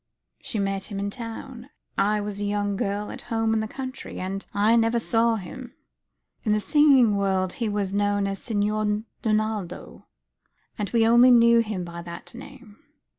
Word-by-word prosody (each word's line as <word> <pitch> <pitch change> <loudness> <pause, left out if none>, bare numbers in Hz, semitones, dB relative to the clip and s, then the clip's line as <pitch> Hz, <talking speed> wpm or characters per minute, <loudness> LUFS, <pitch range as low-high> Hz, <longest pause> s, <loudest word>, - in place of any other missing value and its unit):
She - - -4
met 195 -1 -1
him 205 - -6
in 200 0 -2
town. 240 +2 -8 0.3
I 210 +1 +1
was 205 -1 -5
a - - -2
young 205 0 -1
girl 200 +2 -2
at - - -8
home 225 -1 +1
in 220 - +1
the 220 - -2
country, 260 +3 -7
and 195 +2 -4
I 210 +3 +3
never 230 0 +3
saw 230 0 +2
him. 185 -6 -8 0.7
In 210 - +2
the 215 - +2
singing 265 -4 +4
world 190 -2 0
he 230 -3 -2
was 200 -2 -2
known 205 0 +1
as 195 -1 -3
Signor 210 -1 -1 0.2
Donaldo; 215 -4 -2 0.7
and 205 -3 -3
we 230 -2 +3
only 240 +2 +7
knew 235 -1 +6
of 230 - +1
him 205 -4 -3
by 170 0 -7
that 170 +6 -9
name." 250 -4 -13
210 Hz, 180 wpm, -25 LUFS, 200-230 Hz, 0.7 s, only